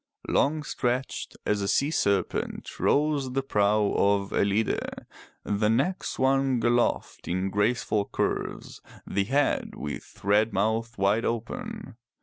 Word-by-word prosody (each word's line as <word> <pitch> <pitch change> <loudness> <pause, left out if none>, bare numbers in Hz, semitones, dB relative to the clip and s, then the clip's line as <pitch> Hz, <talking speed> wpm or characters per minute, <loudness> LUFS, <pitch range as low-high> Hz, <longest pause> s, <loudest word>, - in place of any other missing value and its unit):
Long 150 +2 +2
stretched 125 -2 -2
as 105 -1 +1
a 100 - -1
sea 140 +8 +2
serpent 100 - -1
rose 145 -3 +1
the 135 0 0
prow 105 -3 +2
of 100 0 +2
Ellide, 100 +2 0 0.4
the 105 +1 +1
neck 140 +12 +1
swung 130 -2 +1
aloft 120 0 0
in 95 +2 -1
graceful 105 0 +1
curves, - - -3 0.2
the 100 0 0
head 140 +5 0
with 75 -1 -7
red 105 +2 +3
mouth 110 +3 0
wide 100 +4 +2
open. 130 - -4
115 Hz, 125 wpm, -27 LUFS, 100-135 Hz, 0.4 s, red